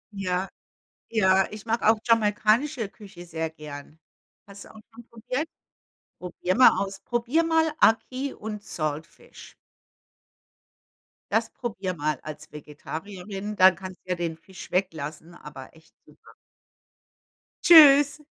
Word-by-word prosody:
Ja. 185 -1 -2 0.6
Ja, 190 -4 +3
ich 215 0 -10
mag 230 +1 -1
auch 220 +1 +4
jamaikanische 225 +2 +1
Küche 195 -5 -13
sehr 160 -1 -4
gern. 150 -1 -11 0.5
Hast 200 0 -12
du - - -16
auch 220 - -13
schon 235 +1 -14
probiert? 250 +7 -4 0.7
Probier 180 0 -3
mal 255 - +8
aus. 195 0 -9
Probier 245 +7 0
mal 320 -1 +2
Aki 255 +5 +1
und 210 -1 -7
Saltfish. 155 -2 -7 1.8
Das - - +1
probier 200 -6 -5
mal 150 -2 -2
als 150 -1 -10
Vegetarierin, 190 +7 -8
dann 185 -1 +6
kannst 185 -1 -10
ja 180 -1 -2
den 165 -2 -4
Fisch 180 +1 -13
weglassen, 165 -3 -3
aber 140 -5 -12
echt 160 +1 -22
super. - - -20 1.3
Tschüss. 295 -2 +7
195 Hz, 120 wpm, -25 LUFS, 165-230 Hz, 1.8 s, mal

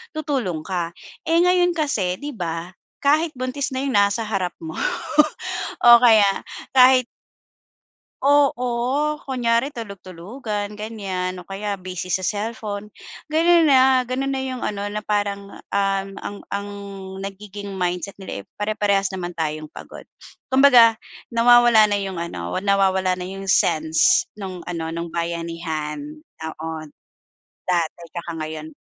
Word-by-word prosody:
tutulong 265 - -2
ka. 175 -3 -2 0.3
Eh, 330 +1 +2
ngayon 360 0 +4
kasi 215 - 0
di 290 +1 -5
ba, 170 -1 -4 0.3
kahit 310 +3 +3
buntis 255 +2 -2
na 265 - -1
yung 265 - -1
nasa 200 +3 +3
harap 190 -4 -2
mo 160 -1 -6 1.1
o 240 0 +9
kaya 220 -4 +7 0.5
kahit 255 -1 +6 1.2
Oo, 280 +1 +2
kunyari 245 -1 0
tulug-tulugan, 205 - -6
ganyan, 195 -4 -4
o 180 - -9
kaya 200 +2 -4
busy 185 -1 -6
sa 185 +2 0
cellphone. 210 0 -3 0.4
Gano'n 330 +1 +4
na, 260 -1 +5
gano'n 270 +2 -1
na 265 - -1
yung 260 -1 -4
ano, 205 0 -2
na 210 0 -5
parang, 200 -1 -2
um, 195 -1 -1
ang 205 - -6
ang 200 0 -4 0.5
nagiging 200 0 -7
mindset 180 +2 -2
nila 190 - -6
eh, - - -13
pare-parehas 205 -2 0
naman 175 -2 -5
tayong 155 -1 -3
pagod. - - -12 0.4
Kumbaga, 250 -4 +7 0.3
nawawala 235 -2 +6
na 200 - +1
yung 190 -2 -4
ano, 90 - -4
nawawala 190 -2 +2
na 180 - -4
yung 195 0 -7
sense 185 - +3
nung 190 -4 -7
ano, 165 -2 -4
nung 170 0 -5
bayanihan 165 - -3 0.4
noon, 160 0 -6 0.8
dati 175 -2 0
tsaka 170 -1 -6
ngayon. 155 0 -6
200 Hz, 130 wpm, -22 LUFS, 180-245 Hz, 1.2 s, o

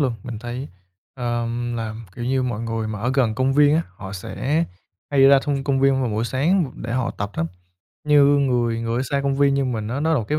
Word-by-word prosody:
luôn. 130 -4 +2
Mình 120 -3 -6
thấy, 120 +4 -6 0.5
ờm, 120 -1 -2
làm, 110 0 -5
kiểu 120 - -5
như, 130 +1 +1
mọi 120 -3 -2
người 115 -1 -3
mà 105 -1 -5
ở 125 +4 0
gần 120 -5 +2
công 130 +3 +1
viên 145 +1 +5
á, 165 - +2
họ 95 -1 -8
sẽ 145 - -1 0.5
hay 140 -2 +4
ra 135 0 +8
thông 140 -2 -1
công 135 -2 +1
viên 135 -1 +3
vào 125 -4 0
buổi 110 +2 -1
sáng 145 +4 +1
để 120 +1 -5
họ 130 -1 0
tập 100 0 -4
lắm. 80 - -1 0.6
Như 145 -1 +6
người 125 -5 +2
người 115 0 -2
ở - - 0
xa 140 +1 -1
công 140 0 0
viên 140 -1 +3
như 140 -1 +1
mình 110 -4 -2
á, 130 +5 -2
nó 160 +2 +1
là 150 - +3
một 110 - -2
cái 150 - +1
125 Hz, 250 wpm, -22 LUFS, 115-140 Hz, 0.6 s, ra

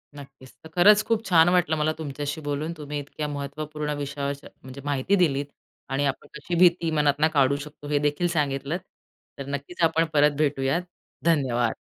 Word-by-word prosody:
नक्कीच, 135 -2 -13
तर 160 - -11
खरंच 205 +5 +6
खूप 225 0 0
छान 175 -3 +5
वाटलं 180 -3 +2
मला 155 +1 +1
तुमच्याशी 145 +1 -4
बोलून 145 +3 -3
तुम्ही 150 -1 -5
इतक्या 150 +1 -5
महत्त्वपूर्ण 150 +1 -4
विषयावर 140 0 -3 0.3
म्हणजे 130 +1 -9
माहिती 145 +7 +1
दिलीत 145 -7 +2 0.4
आणि 135 +1 0
आपण 135 -1 -3
कशी 150 +4 -4
भीती 170 -2 +4
मनातनं 150 0 +3
काढू 140 -1 +3
शकतो, 145 0 -9
हे 145 -1 +1
देखील 150 +4 0
सांगितलंत 150 -1 -1 0.6
तर 140 - -6
नक्कीच 140 +5 -5
आपण 165 0 +3
परत 150 -1 +4
भेटूयात. 145 +2 +1 0.4
धन्यवाद. 130 -8 +2
150 Hz, 160 wpm, -25 LUFS, 140-160 Hz, 0.6 s, खरंच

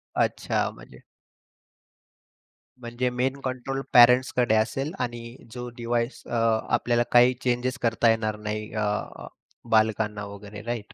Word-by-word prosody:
अच्छा - - 0
म्हणजे - - -15 1.8
म्हणजे 120 +1 -2
मेन 130 +3 -2
कंट्रोल 130 +1 -3
पेरेंट्सकडे 125 -1 +5
असेल 135 +7 0
आणि 120 -1 -5 0.2
जो 125 0 -6
डिव्हाइस 120 +1 -2
अ, - - -7 0.4
आपल्याला 120 0 +2
काही 125 +1 +6
चेंज 125 +1 0
करता 115 0 +2
येणार 110 -1 0
नाही 105 0 -4
अ, 105 -1 -1 0.8
बालकांना 110 -1 +1
वगैरे 100 +1 -10
राइट? 120 -2 -5
120 Hz, 115 wpm, -25 LUFS, 110-125 Hz, 1.8 s, काही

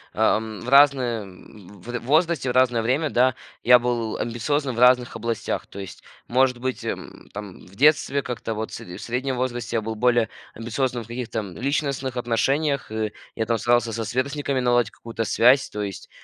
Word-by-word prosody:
э - - -20
эм, 110 -1 +1
в 120 - -5
разное 135 -5 +5
в 100 +4 -10
возрасте 155 0 +1
в - - -1
разное 125 -2 +3
время, 135 +6 0
да, 130 0 +3 0.3
я 125 0 +8
был 120 -2 -2
амбициозным 130 +3 -1
в - - -4
разных 125 0 +4
областях. 115 0 -3
То - - -13
есть, 95 -2 -8 0.3
может 125 0 +2
быть, 130 +1 -4
м, - - -6
там 100 -2 -8
в 95 - -17
детстве 140 +1 +3
как-то 115 -2 -4
вот, 110 +1 -4
сре 90 0 -8
в - - -10
среднем 130 +2 -2
возрасте, 120 -2 -2
я - - 0
был 110 +1 -3
более 120 0 +2 0.3
амбициозным 120 +2 -2
в - - -16
каких-то, 120 -1 -4
м, 100 -4 -7
личностных 135 -1 -1
отношениях. 135 +4 0
И 110 -1 -2 0.2
я 110 - -1
там 115 0 0
старался 120 -1 +2
со 115 +1 -2
сверстниками 135 +4 -1
наладить 120 -3 +2
какую-то 115 0 -5
связь. 125 +4 +4
То 105 - -4
есть, 100 -2 -7
120 Hz, 185 wpm, -24 LUFS, 110-130 Hz, 0.3 s, я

